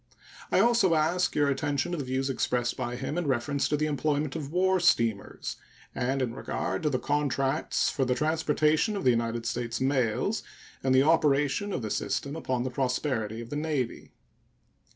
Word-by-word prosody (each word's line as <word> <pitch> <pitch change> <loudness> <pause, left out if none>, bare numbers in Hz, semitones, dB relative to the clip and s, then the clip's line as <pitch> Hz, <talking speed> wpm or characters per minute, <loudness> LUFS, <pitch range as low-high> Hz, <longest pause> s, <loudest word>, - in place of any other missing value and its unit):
I - - +4
also 225 -7 +4
ask 165 +4 +1
your 145 -1 +3
attention 140 +2 -1
to 175 - -2
the - - -2
views 130 +1 -1
expressed 125 -2 0
by 120 0 -3
him 135 +6 -3
in 170 - -2
reference 140 +2 0
to 150 - +1
the 155 - 0
employment 150 0 -1
of 150 -3 -5
war 190 +2 +2
steamers 115 - +1 0.4
and 130 +2 0
in 120 -2 -2
regard 135 +1 -3
to 155 - +1
the 130 - 0
contracts 135 -1 0
for 140 - 0
the 125 -1 +1
transportation 155 - +1
of 195 - -3
the 125 - +5
United 115 0 -1
States 120 -1 -2
mails 135 - +1 0.4
and 130 -1 +2
the 130 - +6
operation 150 +4 +2
of 130 - -3
the 110 - -3
system 140 +2 -2
upon 130 -6 -2
the 130 - -3
prosperity 125 -4 -1
of 115 - -10
the - - -3
Navy. 150 -5 -2
140 Hz, 180 wpm, -28 LUFS, 125-155 Hz, 0.4 s, the